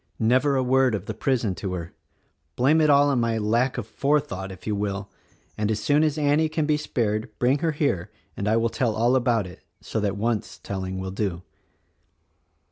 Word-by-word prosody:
Never 130 +5 +2
a 130 - +2
word 130 -2 +3
of 100 -1 -5
the 110 - -4
prison 115 -2 0
to 95 0 -5
her! 85 -2 -6 0.6
Blame 145 +6 +3
it 155 - +4
all 145 0 +5
on 135 -3 +2
my 115 -1 0
lack 115 +5 +1
of 120 - -3
forethought, 135 -7 -1
if 95 - -12
you 105 - -1
will; 100 -1 -3 0.4
and 105 0 -1
as 110 -1 0
soon 145 +7 +2
as 155 -1 +1
Annie 150 +1 +2
can 155 -1 -1
be 150 0 +2
spared 110 -7 -1
bring 130 +4 +2
her 165 -2 0
here 140 - -1 0.3
and 100 - -3
I 110 +2 +3
will 115 0 +1
tell 115 -1 -1
all 120 +3 +3
about 120 -5 +2
it, 90 - -11 0.2
so - - -3
that 100 -1 -1
once 110 0 -2
telling 95 -1 -5
will 95 0 -4
do." 95 -3 -3
115 Hz, 205 wpm, -25 LUFS, 100-140 Hz, 0.6 s, all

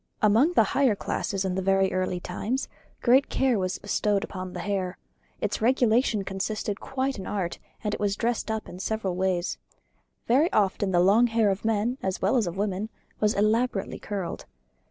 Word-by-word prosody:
Among 225 +11 +4
the 225 - +5
higher 265 -6 +3
classes 195 0 -2
in 185 - -1
very 195 0 +2
early 185 -1 -1
times 220 +9 -3 0.4
great 260 +3 +5
care 255 -5 +2
was 185 0 -1
bestowed 205 0 0
on 185 -1 -6
the - - -5
hair; 190 -3 -2 0.4
its - - -1
regulation 235 -2 +3
constituted 200 +2 -3
quite 265 -3 -2
an 190 - -6
art; 185 -4 -3 0.2
and 210 -1 -1
it - - -3
was 205 -1 0
dressed 235 +1 -1
up 220 0 -2
in 180 - -9
several 200 -3 -2
ways. 185 -1 -1 0.7
Very 280 +8 +3
often 200 -1 +1
the 180 -2 +3
long 210 +6 +5
hair 225 -3 +2
of 195 - -3
men, 225 +4 0
as 190 -1 -2
well 195 +7 +2
as 230 -7 +2
of 175 +2 -5
women, 200 +1 -1 0.3
was 210 0 +2
elaborately 215 0 +1
curled. 195 -4 -5
205 Hz, 175 wpm, -26 LUFS, 190-230 Hz, 0.7 s, the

